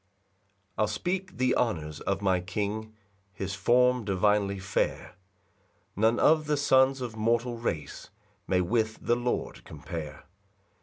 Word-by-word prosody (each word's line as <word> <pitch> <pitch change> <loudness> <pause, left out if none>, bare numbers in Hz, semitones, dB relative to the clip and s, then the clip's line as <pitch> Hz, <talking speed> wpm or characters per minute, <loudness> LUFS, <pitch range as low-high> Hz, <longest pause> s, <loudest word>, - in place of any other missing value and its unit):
1 - - -9
I'll 110 - +3
speak 180 - -3
the 130 0 +2
honours 75 -10 -1
of 100 +1 -2
my 95 -2 +3
King, 105 +4 -4 0.4
His 95 +1 -4
form 125 +4 +3
divinely 100 0 +1
fair; 95 -1 -2 0.8
None 110 +3 +2
of 155 -1 +4
the 150 -1 +1
sons 135 -1 +3
of 120 -3 -5
mortal 115 +2 0
race 80 -11 -4 0.4
May 90 -1 +2
with 110 +4 0
the 120 - +1
Lord 120 0 -3
compare. 75 -1 -8
110 Hz, 135 wpm, -28 LUFS, 95-125 Hz, 0.8 s, of